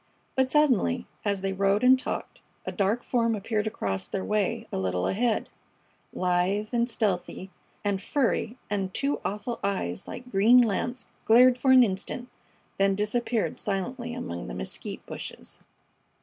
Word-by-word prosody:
But 265 0 +2
suddenly, 255 -4 +2 0.2
as 200 -2 -1
they 195 0 -1
rode 195 +3 +2
and 260 +1 +6
talked, - - -5 0.2
a - - -3
dark 210 +4 0
form 230 -2 +1
appeared 210 +1 -1
across 95 - -3
their 190 - -3
way 215 +2 0
a - - -2
little 90 -1 -1
ahead, 225 - +1 0.6
lithe 185 +4 0
and 240 0 +2
stealthy 190 -4 -2 0.3
and 200 -2 0
furry, 245 -2 0
and 195 -2 -2
two 280 +1 0
awful 210 +4 -3
eyes 140 - -2
like 250 0 -8
green 210 +6 +6
lamps 240 +1 0 0.2
glared 245 +3 +6
for 260 +2 0
an 260 -1 +8
instant, 235 +4 -3 0.5
then 195 0 +3
disappeared 225 +2 -1
silently 240 +5 -3
among 85 - -5
the - - -6
mesquite 60 - -5
bushes. - - -8
210 Hz, 150 wpm, -27 LUFS, 195-245 Hz, 0.6 s, an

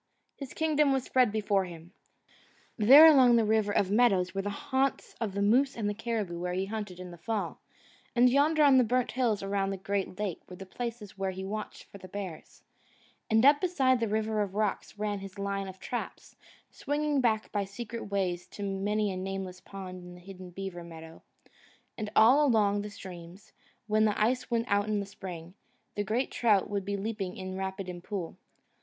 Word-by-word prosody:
His 275 -3 -9
kingdom 300 -2 +2
was 265 -2 +1
spread 255 -4 +2
before 205 -2 +1
him. 170 0 -11 0.8
There 265 +8 +9
along 260 -6 +7
the 230 -2 +3
River 215 -1 +2
of 200 -1 +1
Meadows 195 -6 +3
were 195 - -1
the 205 - -3
haunts 265 +6 -1
of 215 -4 -2
the 200 - 0
moose 255 +7 +3
and 215 -3 -1
the 205 - 0
caribou 210 -6 -3
where 180 0 -3
he 190 +1 -1
hunted 205 -3 -6
in 180 -1 -8
the 175 - -12
fall; 215 +5 -3 0.6
and 245 +1 +6
yonder 295 +4 +3
on 275 -3 +6
the - - +5
burnt 245 +2 0
hills 235 -6 0
around 195 0 -1
the 195 - -3
great 195 -1 -3
lake 205 -5 -3
were 180 - -8
the 195 - -9
places 225 -2 -6
where 195 0 0
he 190 0 -5
watched 215 +2 -6
for 200 - -14
the 185 - -11
bears; 185 -4 -8 0.7
and 220 +2 +4
up 285 +1 +6
beside 270 -9 +2
the 230 - 0
River 215 0 0
of 200 -1 -3
Rocks 210 -1 -2
ran 205 -1 -2
his 195 0 -10
line 200 0 -3
of 190 0 -9
traps, 245 - -6 0.4
swinging 295 -1 -1
back 220 -3 0
by 205 -1 0
secret 225 +4 -7
ways 185 -3 -2
to 205 - -8
many 200 +1 -1
a - - -4
nameless 185 -1 -5
pond 185 -2 -8
and 180 0 -11
hidden 185 0 -11
beaver 180 -1 -7
meadow; 165 -1 -11 0.7
and 215 -2 -4
all 255 +7 +6
along 210 -6 +3
the 210 - -6
streams, 185 -1 -11 0.3
when 215 0 +2
the 210 -1 0
ice 245 +4 +1
went 230 -1 0
out 205 +1 +1
in 210 -1 0
the 200 - -3
spring, 180 -3 -9 0.4
the 205 - -2
great 225 +6 -1
trout 210 -5 +2
would 200 -2 -2
be 200 0 -2
leaping 200 -2 -4
in 185 0 -6
rapid 190 0 -4
and 175 -1 -7
pool. 185 -6 -5
205 Hz, 200 wpm, -29 LUFS, 190-230 Hz, 0.8 s, There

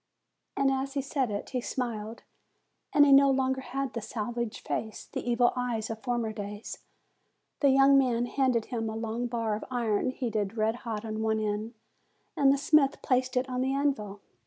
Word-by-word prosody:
And 275 0 +3
as 270 +1 -2
he 275 - +1
said 275 -3 -1
it, 205 -1 -5
he 255 -2 -1
smiled; 230 -3 -4 0.7
and 290 0 +6
he 280 - +4
no 275 0 +7
longer 265 0 +1
had 270 +1 -4
the 230 - -3
savage 230 +1 -4
face, 220 -1 -4
the - - -5
evil 240 0 +3
eyes 235 -3 -2
of 220 - -5
former 235 -1 -1
days. 205 +1 -7 0.8
The 280 - +4
young 275 +1 +6
man 245 -3 +1
handed 250 -3 +1
him 225 -3 -3
a 220 - -5
long 225 +2 -2
bar 230 -2 -1
of 215 - -6
iron 235 -2 0
heated 225 -5 -2
red 220 +1 +1
hot 225 -3 -5
on 220 0 -3
one 220 0 +1
end, 215 +2 -3 0.6
and 275 -1 +5
the 280 - +3
smith 280 0 +3
placed 255 -1 +1
it 255 +1 +1
on 250 -1 -2
the 265 +1 0
anvil. 215 -8 -1
240 Hz, 185 wpm, -29 LUFS, 220-265 Hz, 0.8 s, no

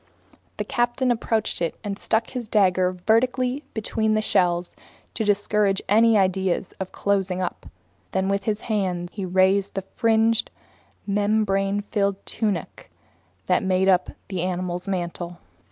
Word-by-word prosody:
The - - -1
captain 240 +1 +1
approached 225 -4 -1 0.2
and 200 -1 -4
stuck 225 +1 0
his 250 -3 -5
dagger 185 -3 +3
vertically 250 +4 +2
between 220 0 0
the 215 - +2
shells 175 -3 +1 0.4
to - - -1
discourage 205 -1 +2
any 225 +2 +5
ideas 190 -1 0
about 190 -1 -4
closing; 190 -2 0 0.6
then 190 0 0
with 195 0 -1
his 215 -1 -1
hands 185 -5 -2
he 200 -3 -4
raised 190 +2 +2
the 195 - -2
fringed, 225 +2 +1 0.6
membrane 205 -1 +1
filled 200 -2 +1
tunic 210 -4 -3 0.6
that - - +2
made 190 -1 +1
up 185 -1 +3 0.2
the 185 -3 -3
animal's 180 0 -3
mantle. 175 -2 -3
200 Hz, 130 wpm, -24 LUFS, 185-220 Hz, 0.6 s, any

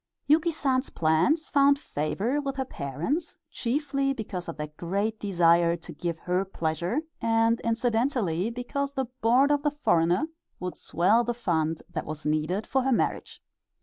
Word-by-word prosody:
Yuki 315 +3 +4
San's 270 -4 0
plans 170 - +2
found 280 0 +4
favor 230 - -2
with 275 -1 -3
her 265 -1 -2
parents, 170 - -3
chiefly 275 +2 0
because 195 -8 -5
of 165 - -6
their 150 0 -5
great 200 +6 -2
desire 170 -3 +3
to 170 0 -10
give 170 +2 -3
her 180 +3 0
pleasure, 175 - -2 0.2
and 225 0 +2
incidentally 230 - 0
because 275 +4 -3
the 265 -1 0 0.2
board 255 +6 +4
of 290 -1 +2
the 295 - +2
foreigner 175 - +2 0.3
would 180 0 -4
swell 205 +7 +2
the 240 0 -2
fund 165 -8 -1
that - - -5
was 155 0 -6
needed 155 +7 0
for 265 - +1
her 265 +1 0
marriage. 240 - -1
225 Hz, 155 wpm, -27 LUFS, 170-275 Hz, 0.3 s, Yuki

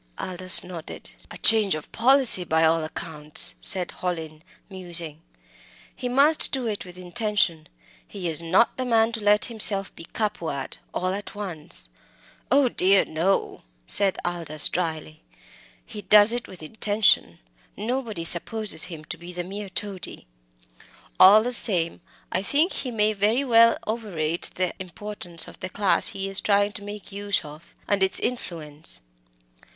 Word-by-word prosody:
Aldous 185 -1 0
nodded. 175 -3 -9 0.2
"A - - -9
change 215 -5 +6
of 155 - -9
policy 255 -5 +5
by 160 -1 +1
all 160 0 +2
accounts," 155 -1 -1
said 185 -2 +3
Hallin, 160 -4 -5 0.3
musing. 170 -5 -2 0.7
"He 250 - -5
must 285 +5 +3
do 265 -3 -2
it 210 -4 -4
with 180 0 -13
intention. 180 -4 -1 0.4
He 190 -4 -6
is 160 -1 0
not 180 +8 +1
the 255 - -3
man 225 -2 +2
to 225 - -5
let 210 0 +3
himself 205 -4 0
be 165 - -9
be - - -29
Capua 170 -10 -3
ed - - -8
all 185 +1 -2
at 205 +1 -7
once." 165 - +1 0.6
"Oh 275 +1 +3
dear, 195 -4 +2
no!" 170 +5 -2 0.2
said 195 - +2
Aldous, 165 -4 -1
drily. 160 -3 -4 0.6
"He 210 - -9
does 205 +2 +6
it 240 0 -4
with 180 -4 -12
intention. 205 - +1 0.4
Nobody 225 -4 -4
supposes 190 +2 -1
him 165 -4 -10
to 165 - -6
be 175 +1 -10
the 175 0 -5
mere 200 +2 -8
toady. 195 - -5 0.9
All 205 +4 +8
the 245 - -2
same 175 -8 +6 0.3
I - - -1
think 300 - +1
he 260 - -4
may 215 -2 0
very 215 +6 +1
well 230 -3 +4
overrate 175 -8 -3
the 185 -1 -2
importance 185 -2 -6
of - - -14
the 185 - -6
class 200 +1 +1
he 195 -1 -3
is 195 0 +2
trying 205 0 +1
to 205 - -8
make 205 0 -9
use 200 -2 -2
of, 150 +3 -14
and 200 -1 0
its 190 0 +1
influence. 155 - -6
190 Hz, 155 wpm, -24 LUFS, 170-215 Hz, 0.9 s, All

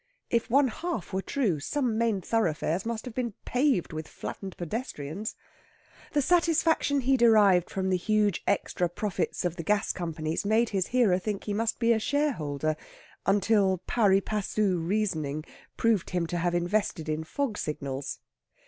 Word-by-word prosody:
If 235 -1 +1
one 270 +2 +4
half 320 - -4
were 190 - 0
true, 205 - 0
some 250 - -1
main 225 -3 +1
thoroughfares 180 -3 0
must 230 0 -3
have 250 - -7
been 235 -4 -3
paved 250 - +1
with 155 0 -5
flattened 195 -2 -7
pedestrians. 180 - -4 0.8
The 290 -2 +2
satisfaction 330 -3 +3
he 265 +2 +3
derived 210 -7 +5
from 190 -1 -2
the 185 - +3
huge 210 0 +1
extra 180 -3 0
profits 190 0 -2
of 175 0 -1
the 165 - -4
gas 210 +4 +1
companies 160 -2 -3
made 220 +3 +2
his 190 -3 0
hearer 230 -8 +3
think 205 +1 -3
he 205 - -3
must 225 +2 0
be 235 -1 +3
a 220 - +1
shareholder, 155 - 0 0.5
until 195 -1 +3
pari 200 -4 +3
passu 205 -2 0
reasoning 165 -5 -1 0.3
proved 225 -5 +2
him 180 -2 0
to 175 +1 -3
have 175 0 0
invested 175 -2 0
in 155 +1 -1
fog 230 - -2
signals. 140 -2 -4
205 Hz, 155 wpm, -28 LUFS, 175-230 Hz, 0.8 s, derived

